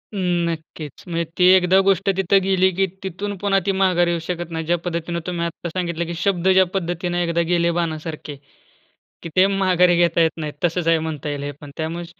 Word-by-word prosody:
नक्कीच, 170 Hz, -5 st, -3 dB
म्हणजे 170 Hz, -1 st, -1 dB
ती 180 Hz, -, +4 dB
एकदा 185 Hz, 0 st, +4 dB
गोष्ट 195 Hz, 0 st, +2 dB
तिथं 195 Hz, +1 st, +3 dB
गेली 190 Hz, -1 st, +3 dB
की 195 Hz, +1 st, +2 dB, 0.2 s
तिथून 195 Hz, +2 st, -4 dB
पुन्हा 195 Hz, 0 st, +1 dB
ती 200 Hz, -, +2 dB
माघारी 180 Hz, -2 st, +3 dB
येऊ 170 Hz, -, -1 dB
शकत 175 Hz, -1 st, -4 dB
नाही. 160 Hz, -1 st, -4 dB
ज्या 175 Hz, +2 st, +1 dB
पद्धतीने 170 Hz, 0 st, -3 dB
तुम्ही 170 Hz, -1 st, -2 dB
आता 170 Hz, +1 st, -5 dB
सांगितलं, 170 Hz, -1 st, -3 dB
की 170 Hz, -, -5 dB
शब्द 180 Hz, 0 st, 0 dB
ज्या 190 Hz, 0 st, +5 dB
पद्धतीने 175 Hz, -1 st, -1 dB
एकदा 170 Hz, 0 st, 0 dB
गेले 170 Hz, -1 st, +2 dB
बाणासारखे, 155 Hz, -2 st, -4 dB, 0.9 s
की 170 Hz, -, -6 dB
ते 185 Hz, -, +6 dB
माघारी 185 Hz, -3 st, +3 dB
घेता 170 Hz, -1 st, +3 dB
येत 160 Hz, -1 st, +3 dB
नाहीत, 150 Hz, -2 st, -4 dB
तसच 175 Hz, 0 st, 0 dB
आहे 165 Hz, -1 st, +4 dB
म्हणता 155 Hz, -2 st, -4 dB
येईल 145 Hz, -1 st, -4 dB
हे 145 Hz, -, -3 dB
पण 145 Hz, -1 st, -10 dB
त्यामुळे 165 Hz, +2 st, -4 dB
175 Hz, 195 wpm, -21 LUFS, 165-185 Hz, 0.9 s, ते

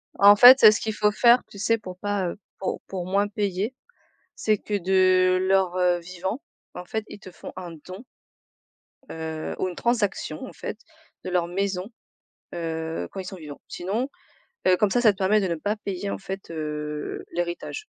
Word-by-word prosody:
En 205 Hz, +1 st, +8 dB
fait, 250 Hz, +4 st, +9 dB
heu, 215 Hz, -, +11 dB
ce 215 Hz, -, -1 dB
qu'il 220 Hz, -1 st, -3 dB
faut 210 Hz, 0 st, +2 dB
faire, 240 Hz, +3 st, +5 dB
tu 200 Hz, -, -12 dB
sais, 230 Hz, +2 st, +2 dB
pour 185 Hz, -4 st, -9 dB
pas, 205 Hz, -3 st, -1 dB
heu, -, -, -7 dB, 0.2 s
pour 190 Hz, -, -3 dB
pour 185 Hz, -2 st, -5 dB
moins 200 Hz, +2 st, +1 dB
payer, 205 Hz, +3 st, -2 dB, 0.6 s
c'est 215 Hz, -2 st, +1 dB
que 210 Hz, -, -5 dB
de 185 Hz, -1 st, +3 dB
leur, 185 Hz, -1 st, +2 dB
heu, 180 Hz, -1 st, +3 dB
vivant, 185 Hz, +7 st, -5 dB, 0.3 s
en 180 Hz, -, -7 dB
fait, 220 Hz, +4 st, -3 dB
ils -, -, -10 dB
te 185 Hz, -, -12 dB
font -, -, -10 dB
un 175 Hz, -2 st, -7 dB
don, 185 Hz, +7 st, -9 dB, 1.1 s
heu, 160 Hz, -1 st, -5 dB
ou 185 Hz, -, 0 dB
une 180 Hz, -, -6 dB
transaction, 205 Hz, -9 st, -1 dB
en -, -, -10 dB
fait, 215 Hz, -, -6 dB, 0.5 s
de -, -, -3 dB
leur 175 Hz, -1 st, +1 dB
maison, 190 Hz, +2 st, -2 dB, 0.7 s
heu, 160 Hz, -1 st, -4 dB
quand 195 Hz, -, -6 dB
ils -, -, -6 dB
sont 190 Hz, +1 st, -7 dB
vivants. 150 Hz, -4 st, -10 dB
Sinon, 215 Hz, +9 st, -2 dB, 0.6 s
heu, 180 Hz, -, +6 dB
comme 210 Hz, 0 st, +2 dB
ça, 245 Hz, -, +2 dB
ça 220 Hz, -4 st, +6 dB
te 195 Hz, -, -19 dB
permet 205 Hz, +2 st, +3 dB
de 190 Hz, -, -1 dB
ne 170 Hz, -, -1 dB
pas 205 Hz, +7 st, -2 dB
payer 200 Hz, -1 st, -4 dB
en -, -, -3 dB
fait, 195 Hz, -1 st, -7 dB
heu, 150 Hz, -1 st, -4 dB
l'héritage. 175 Hz, -, -4 dB
190 Hz, 195 wpm, -25 LUFS, 175-205 Hz, 1.1 s, heu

